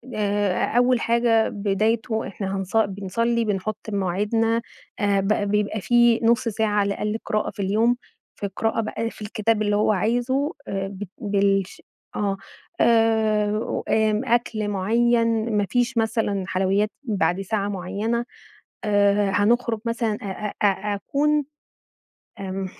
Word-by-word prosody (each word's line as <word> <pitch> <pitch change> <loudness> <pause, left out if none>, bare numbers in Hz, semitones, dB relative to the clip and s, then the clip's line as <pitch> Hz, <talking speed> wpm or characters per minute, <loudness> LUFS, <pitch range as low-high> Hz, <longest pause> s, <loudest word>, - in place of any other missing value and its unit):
آآ، 205 -2 +1
أول 245 0 +4
حاجة 230 -1 +2
بدايته 220 +3 0
إحنا 195 -1 -4
هنص 195 +3 -2
بنصلي 220 +3 0
بنحط 205 0 -2
بمواعيدنا 210 +4 0 0.4
آآ، 200 -1 +2
ب 195 - -2 0.2
بيبقى 210 0 0
فيه 240 +1 +4
نُص 235 +1 +3
ساعة 220 0 0
على 200 0 +1
الأقل 210 +2 -2
قراءة 215 0 0
في 205 - -6
اليوم، 220 +5 +2 0.4
في 200 - -3
قراءة 225 0 0
بقى 225 +1 -3
في - - -15
الكتاب 215 +1 0
اللي 205 -1 +1
هو 210 +1 +3
عايزه، 245 - 0
آآ 195 0 -2
ب 195 +1 -7
بالش 200 -3 0 0.3
آه. 200 -2 -1 0.4
آآ، 220 -2 +2
آمم 220 +2 +2
أكْل 235 -3 0
معين 230 +2 +1
ما 205 - +2
فيش 245 0 0
مثلًا 220 -3 0
حلويات 195 +3 +1
بعد 195 -6 0
ساعة 200 +1 -1
معينة، 205 +5 -2 0.6
آآ، 205 -1 +3
هنخرج 230 +2 +2
مثلًا 230 -1 0
أ - - -7 0.4
أ - - +6
أ 205 +1 +1
أكون 295 +8 +1 1.0
إمم، 195 0 -4
215 Hz, 135 wpm, -23 LUFS, 200-230 Hz, 1.0 s, أ